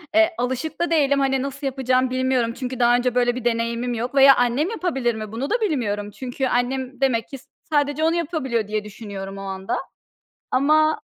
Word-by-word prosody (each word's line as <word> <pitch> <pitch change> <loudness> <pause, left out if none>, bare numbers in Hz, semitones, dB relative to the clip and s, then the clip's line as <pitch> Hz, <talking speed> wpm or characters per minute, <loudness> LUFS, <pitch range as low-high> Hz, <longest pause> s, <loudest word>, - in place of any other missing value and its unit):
Eee, 330 +1 +5
alışık 260 +7 -3
da 345 - 0
değilim, 280 -3 +3
hani, 270 -1 +1
nasıl 275 +1 -4
yapacağımı 255 -1 +1
bilmiyorum. 255 -2 0
Çünkü 255 0 -5
daha 240 0 +5
önce 250 0 0
böyle 245 -1 +2
bir 250 -1 -6
deneyimim 235 +1 0
yok 240 +4 -4
veya 275 0 +8
annem 245 +7 +1
yapabilir 270 - -1
mi 215 -1 -6
bunu 250 +5 -3
da 485 +1 0
bilmiyorum. 210 - -1
Çünkü 260 +4 -3
annem 255 +1 -1
demek 235 -4 +1
ki 275 - -7 0.3
sadece 290 0 0
onu 325 +1 +3
yapabiliyor 275 - -1
diye 215 0 -2
düşünüyorum 200 -2 -8
o - - -7
anda 190 -1 -3 0.7
ama 310 +4 +3
255 Hz, 185 wpm, -22 LUFS, 235-280 Hz, 0.7 s, veya